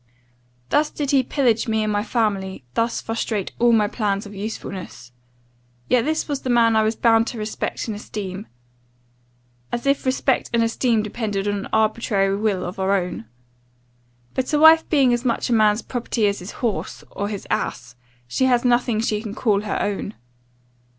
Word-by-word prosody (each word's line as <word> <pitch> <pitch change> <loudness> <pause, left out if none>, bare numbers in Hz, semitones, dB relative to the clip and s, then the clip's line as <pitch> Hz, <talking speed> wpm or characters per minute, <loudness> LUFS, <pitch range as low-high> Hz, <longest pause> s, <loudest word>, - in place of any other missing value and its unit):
"Thus 300 - +2
did 285 -2 -3
he 275 -2 +5
pillage 245 -3 +1
me 220 -1 +1
and 215 0 -1
my 205 0 0
family, 200 - -1
thus 230 - 0
frustrate 225 -3 -3
all 240 0 +5
my 215 -2 +4
plans 205 -2 -1
of 205 - -10
usefulness. 195 - -7 0.8
Yet 250 -1 +3
this 315 +1 -1
was 285 -3 -3
the 255 - -4
man 230 -2 +4
I 220 - +5
was 220 +1 +1
bound 230 0 +3
to 240 - -5
respect 215 0 -3
and 220 - -3
esteem: 205 -1 -6 1.2
as 240 +2 -3
if 275 0 +2
respect 260 0 +1
and 230 -1 +3
esteem 230 -1 +1
depended 210 -2 -3
on 205 - +1
an 200 - -5
arbitrary 215 -3 +1
will 205 -2 -1
of 180 +2 -6
our 190 +1 +2
own! 180 - -3 1.1
But 260 +2 -2
a - - +4
wife 320 +1 +7
being 270 -5 +4
as 240 0 -1
much 245 0 0
a - - +4
man's 215 0 +3
property 240 -3 -1
as 200 0 +1
his 180 - -8 0.2
horse, 220 - -3
or 200 0 -3
his 205 -2 -5
ass, 125 +1 -2 0.3
she 260 - +1
has 245 -1 +2
nothing 240 -2 +2
she 210 -2 -1
can 215 -2 -6
call 205 -4 +1
her 210 -1 -2
own. 205 +1 -3
220 Hz, 180 wpm, -22 LUFS, 205-240 Hz, 1.2 s, wife